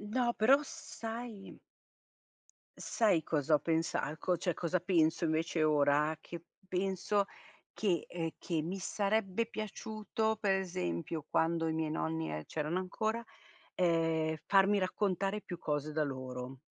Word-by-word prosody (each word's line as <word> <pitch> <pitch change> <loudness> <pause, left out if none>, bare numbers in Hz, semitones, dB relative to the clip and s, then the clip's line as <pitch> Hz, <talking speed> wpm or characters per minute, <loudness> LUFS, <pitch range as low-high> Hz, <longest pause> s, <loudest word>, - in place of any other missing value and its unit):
No, 245 -2 +3
però 255 +6 +5
sai 225 -5 -7 1.2
sai 205 -9 +2
cosa 150 0 +2
ho - - +2
pensa 165 -3 0
eco 170 +3 0
cioè 175 +1 0
cosa 175 +2 0
penso 170 -2 +2
invece 160 0 +1
ora 150 0 +3
che 170 - -7 0.3
penso 190 +2 +1 0.5
che 185 -6 +1
ehm, 165 -2 -2
che 165 -3 -1
mi 175 +5 -3
sarebbe 200 +2 0
piaciuto, 220 0 -2
per 205 -2 +2
esempio 155 - -2
quando 165 0 +2
i 160 - 0
miei 160 -1 -1
nonni, 80 - -1
ehm, 75 0 -4
c'erano 155 +3 -2
ancora, 220 +5 -1 0.5
ehm, 165 -2 +2
farmi 195 +1 +5
raccontare 195 +1 0
più 175 - -6
cose 150 -2 -2
da 155 0 +1
loro; 130 -2 -5
170 Hz, 135 wpm, -33 LUFS, 155-200 Hz, 1.2 s, però